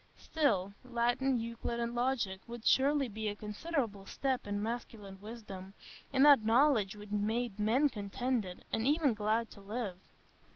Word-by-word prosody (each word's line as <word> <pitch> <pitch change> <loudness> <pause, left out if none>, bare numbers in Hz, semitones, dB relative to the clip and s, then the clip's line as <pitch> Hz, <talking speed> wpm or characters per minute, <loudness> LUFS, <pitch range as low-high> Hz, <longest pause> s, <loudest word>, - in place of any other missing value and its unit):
Still, 200 - 0
Latin, 250 +1 +1
Euclid, 230 +1 -4
and 235 0 -1
Logic 240 -6 0
would 235 -1 -8
surely 275 +1 +4
be 220 0 -4
a 205 - -4
considerable 210 -2 -3
step 265 -5 -1
in 205 0 -1
masculine 210 -3 -5
wisdom,—in 210 +4 -4
that 285 -6 +8
knowledge 225 -3 +3
which 205 0 -11
made 215 +1 -1
men 235 +8 +3
contented, 215 -3 -3
and 225 +3 +1
even 295 -3 +3
glad 215 +2 0
to 200 - -12
live. 200 -2 -4
230 Hz, 140 wpm, -33 LUFS, 205-255 Hz, -, that